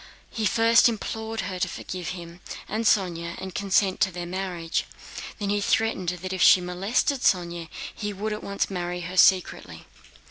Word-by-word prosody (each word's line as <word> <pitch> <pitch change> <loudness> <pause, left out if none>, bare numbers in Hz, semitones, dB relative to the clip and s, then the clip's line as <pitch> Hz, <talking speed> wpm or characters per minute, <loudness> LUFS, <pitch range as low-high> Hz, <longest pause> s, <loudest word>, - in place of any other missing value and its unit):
He 220 -2 0
first 230 +3 +5
implored 220 0 -4
her 185 -1 -5
to - - +1
forgive 180 -2 -6
him 170 -1 -7 0.3
and 225 +2 -2
Sónya 170 -5 +1
and 190 -1 -6
consent 195 0 +1
to 190 - +2
their 175 0 -5
marriage, 175 -2 -3 0.5
then 200 -1 -2
he 205 0 +1
threatened 205 -4 +1
that 180 +1 -4
if 185 - -3
she - - +8
molested 195 +10 0
Sónya 170 -3 +1 0.2
he 210 0 -4
would 210 +2 -3
at 210 - -6
once 200 0 -2
marry 180 -1 -3
her 180 +2 -6
secretly. 185 0 +3
190 Hz, 170 wpm, -25 LUFS, 180-210 Hz, 0.5 s, she